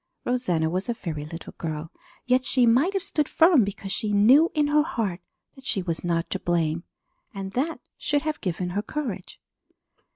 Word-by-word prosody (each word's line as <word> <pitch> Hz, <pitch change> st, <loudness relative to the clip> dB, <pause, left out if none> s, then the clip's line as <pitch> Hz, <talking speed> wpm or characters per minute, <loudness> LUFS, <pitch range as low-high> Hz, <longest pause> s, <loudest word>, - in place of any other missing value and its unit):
Rosanna 180 Hz, -11 st, +1 dB
was 185 Hz, +7 st, -2 dB
a 240 Hz, -, 0 dB
very 155 Hz, -8 st, -5 dB
little 165 Hz, +2 st, -8 dB
girl, 160 Hz, 0 st, -4 dB, 0.3 s
yet 255 Hz, +1 st, +3 dB
she 255 Hz, -1 st, +3 dB
might 260 Hz, +12 st, +4 dB
have 390 Hz, -2 st, -1 dB
stood 300 Hz, -2 st, 0 dB
firm 325 Hz, -6 st, +5 dB
because 195 Hz, -1 st, -5 dB
she 210 Hz, +1 st, -1 dB
knew 255 Hz, +11 st, +6 dB
in 300 Hz, -1 st, +3 dB
her 295 Hz, +1 st, +4 dB
heart 205 Hz, -, -2 dB, 0.3 s
that 270 Hz, -, -16 dB
she 195 Hz, -5 st, 0 dB
was 165 Hz, -2 st, -3 dB
not 170 Hz, -1 st, 0 dB
to -, -, -1 dB
blame 170 Hz, -1 st, 0 dB, 0.5 s
and 195 Hz, -1 st, -5 dB
that 290 Hz, +9 st, -1 dB, 0.2 s
should 290 Hz, -1 st, 0 dB
have 310 Hz, -1 st, -3 dB
given 180 Hz, -1 st, -2 dB
her 200 Hz, +3 st, -1 dB
courage. 225 Hz, -6 st, -5 dB
205 Hz, 185 wpm, -25 LUFS, 175-280 Hz, 0.5 s, knew